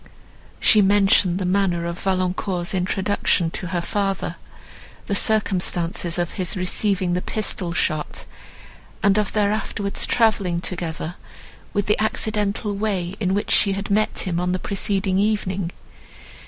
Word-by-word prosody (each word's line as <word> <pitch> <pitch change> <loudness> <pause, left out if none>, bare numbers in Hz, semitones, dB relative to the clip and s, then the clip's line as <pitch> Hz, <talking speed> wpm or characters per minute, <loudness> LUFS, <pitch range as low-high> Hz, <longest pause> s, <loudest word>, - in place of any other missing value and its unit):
She 215 - +6
mentioned 195 -2 +4
the 190 - -2
manner 180 -2 +1
of 170 +1 -4
Valancourt's 185 -1 -1
introduction 190 -2 +1
to 180 - -4
her 175 0 -1
father; 195 -2 -2 0.7
the - - -2
circumstances 180 -5 +1
of 175 -1 -1
his 185 -1 -1
receiving 185 0 0
the 180 - 0
pistol 195 -5 -2
shot, 155 -3 -1 0.8
and 200 +1 +4
of 210 - -1
their 205 -1 +2
afterwards 205 -1 -2
travelling 205 -7 +2
together; 170 -1 -3 0.5
with 205 -1 0
the 210 - +1
accidental 210 -1 -1
way, 195 -4 -2
in 190 -2 0
which 205 - -2
she 200 - +4
had 200 +1 -4
met 215 +2 +1
him, 175 -2 -1
on 180 0 0
the - - +1
preceding 195 0 0
evening. 200 -4 0
195 Hz, 140 wpm, -22 LUFS, 180-205 Hz, 0.8 s, She